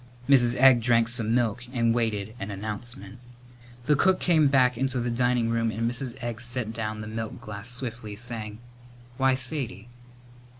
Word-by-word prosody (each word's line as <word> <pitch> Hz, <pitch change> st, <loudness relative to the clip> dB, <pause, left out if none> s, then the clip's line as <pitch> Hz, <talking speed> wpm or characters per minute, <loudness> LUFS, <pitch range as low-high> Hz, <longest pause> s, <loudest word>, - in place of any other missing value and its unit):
Mrs. 125 Hz, -3 st, +5 dB
Egg 130 Hz, -2 st, +6 dB
drank 115 Hz, -1 st, +3 dB
some 115 Hz, -1 st, +1 dB
milk 120 Hz, -1 st, 0 dB
and 115 Hz, -3 st, +1 dB
waited 110 Hz, -3 st, -1 dB
an 100 Hz, -, -5 dB
announcement. 105 Hz, +2 st, -7 dB, 0.7 s
The 150 Hz, +1 st, +4 dB
cook 185 Hz, +6 st, +3 dB
came 160 Hz, -4 st, +3 dB
back 130 Hz, -2 st, +3 dB
into 130 Hz, +1 st, -1 dB
the 120 Hz, 0 st, -1 dB
dining 120 Hz, -1 st, +1 dB
room 115 Hz, -1 st, +1 dB
and 110 Hz, +1 st, -3 dB
Mrs. 125 Hz, +1 st, -2 dB
Egg 120 Hz, -1 st, -4 dB
set 120 Hz, -2 st, -2 dB
down 110 Hz, -1 st, -4 dB
the 105 Hz, -, -7 dB
milk 110 Hz, +2 st, -5 dB
glass 105 Hz, -1 st, -6 dB
swiftly, 120 Hz, -4 st, -6 dB
saying, 110 Hz, -2 st, -6 dB, 0.6 s
"Why, 130 Hz, -1 st, +3 dB
Sadie!" 125 Hz, -5 st, -3 dB
120 Hz, 165 wpm, -26 LUFS, 110-125 Hz, 0.7 s, Egg